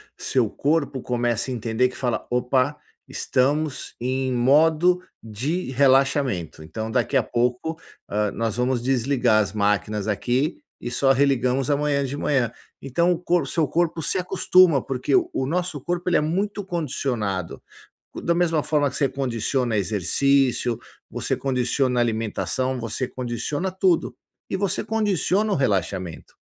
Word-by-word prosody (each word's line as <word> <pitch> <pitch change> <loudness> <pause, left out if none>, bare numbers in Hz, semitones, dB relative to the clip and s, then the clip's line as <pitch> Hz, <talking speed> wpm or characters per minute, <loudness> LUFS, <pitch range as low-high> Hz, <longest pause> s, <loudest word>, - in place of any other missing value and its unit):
seu 125 -4 0
corpo 145 +2 -1
começa 120 0 -1
a - - -2
entender 115 +2 +1
que 125 - -12
fala, 125 -3 -1
"Opa, 125 +3 +1 0.3
estamos 145 +2 -1
em 130 +1 -1
modo 155 +8 +4 0.2
de 130 - -3
relaxamento", 135 - +2
então 110 +8 -5
daqui 125 +3 +1
a 130 - +3
pouco, 125 +8 -1 0.3
ah, 105 0 0
nós 115 -1 -2
vamos 125 -1 0
desligar 125 -3 +2
as 100 -2 -3
máquinas 105 0 0
aqui 125 +7 0 0.2
e 120 - -5
só 135 +2 +3
religamos 135 0 +2
amanhã 145 -1 +1
de 135 +1 -4
manhã. 135 -5 0 0.3
Então 170 +7 +1
o 175 - +1
cor 175 0 +1
o - - -4
seu 160 +1 0
corpo 165 0 0
se 185 - 0
acostuma 180 -5 +4
porque 130 - 0
o 345 - +1
nosso 175 -2 -2
corpo 175 +4 -3
ele 175 - +4
é - - +2
muito 200 +7 -1
condicionado. 125 - -2 0.6
Da 170 - +2
mesma 165 -3 +1
forma 145 -2 +1
que 130 - -10
você 140 - +2
condiciona 125 -2 -1
exercício, 120 +5 +1 0.3
você - - -2
condiciona 125 -1 0
alimentação, 115 +2 -1
você 115 +2 -3
condiciona 130 +9 -3
tudo. 175 -10 +1 0.3
E - - -1
você 195 -1 -1
condiciona 210 -1 +1
o - - +1
relaxamento, 95 - -2
130 Hz, 145 wpm, -23 LUFS, 120-155 Hz, 0.6 s, modo